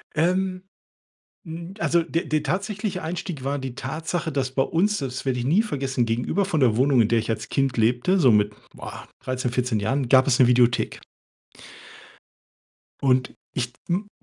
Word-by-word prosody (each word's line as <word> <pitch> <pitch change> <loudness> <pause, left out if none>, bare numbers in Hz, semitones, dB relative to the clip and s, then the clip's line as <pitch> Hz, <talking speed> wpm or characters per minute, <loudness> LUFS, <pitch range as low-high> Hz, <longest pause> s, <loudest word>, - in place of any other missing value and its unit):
Ähm, 185 +3 0 0.8
mm, 170 +2 -8
also, 170 +1 +2
der 165 +2 -2
der 155 -1 0
tatsächliche 195 0 -2
Einstieg 165 -4 -4
war 140 +1 -1
die 130 -2 -6
Tatsache, 160 +3 -3
dass 135 -3 -1
bei 135 0 +2
uns, 205 +5 +1
das 135 -1 -4
werde 125 -2 0
ich 120 - -3
nie 175 +10 +4
vergessen 135 - -1
gegenüber 120 - 0
von 160 -6 -1
der 120 -5 +4
Wohnung, 130 -1 +4
in 110 - +3
der 115 0 +2
ich 115 - -4
als 110 0 -3
Kind 135 -3 0
lebte, 120 - +2
so 130 -7 +6
mit, 105 -1 +3 0.2
boah, - - -9
13, 130 -2 -3
14 125 -3 0
Jahren, 125 +5 -1
gab 130 +1 +6
es 130 -1 +3
'ne 125 - +7
Videothek. 120 -1 +2 2.0
Und 130 -1 +2 0.2
ich 125 -1 -3 0.2
hm 195 +4 -1
135 Hz, 175 wpm, -24 LUFS, 125-170 Hz, 2.0 s, ne